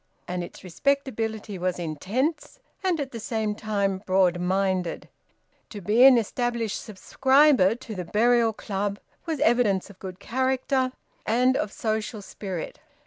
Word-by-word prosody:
And 180 0 -3
its - - -11
respectability 220 -1 -2
was 180 0 -1
intense, 200 - -2 0.2
and 365 -4 +1
at 275 -2 -3
the 230 - -6
same 220 -1 -2
time 200 -3 -1
broad 185 -2 +2
minded. 185 -1 -1 0.6
To 210 - -7
be 210 +6 +3
an 265 -2 +9
established 235 0 -1
subscriber 260 +1 +3
to 240 -2 -9
the 180 -3 -5
Burial 230 +4 +3
Club 200 -1 -3 0.3
was 320 -3 -2
evidence 210 -5 +2
of 185 - -19
good 185 -1 -8
character 260 +2 0 0.4
and 250 +3 +3
of 210 - -1
social 215 0 -3
spirit. 190 -4 -6
215 Hz, 140 wpm, -25 LUFS, 190-250 Hz, 0.6 s, an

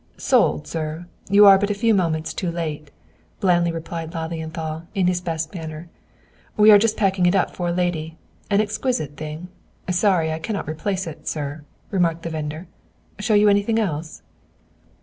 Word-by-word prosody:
"Sold, 75 -1 +2
sir; 160 +1 -4 0.2
you 205 +1 +7
are 195 -1 +8
but 205 +1 0
a 205 - 0
few 225 +2 +2
moments 165 -5 0
too 180 - -2
late," 155 -3 -4 0.5
blandly 175 -3 +2
replied 165 0 -6
Lilienthal, 160 0 -5
in 190 -2 +2
his 180 0 +1
best 165 -1 -3
manner. 160 -1 -7 0.7
"We 215 +1 +8
are 205 - +9
just 220 +1 +1
packing 190 -3 +2
it 175 - +3
up 195 - +1
for 175 - -2
a - - 0
lady. 170 -2 -2 0.3
An 200 0 +3
exquisite 215 - -2
thing; 155 +3 -7 0.4
sorry 180 -3 +2
I 160 - -3
cannot 200 +2 -4
replace 185 +5 -2
it, 160 -2 -9
sir," 145 0 -4 0.3
remarked 170 -3 +1
the 165 - -4
vendor, 155 +2 -5 0.5
"Show 215 +1 +1
you 210 +1 +5
anything 205 +2 +3
else?" 165 -7 -3
170 Hz, 170 wpm, -22 LUFS, 160-200 Hz, 0.7 s, are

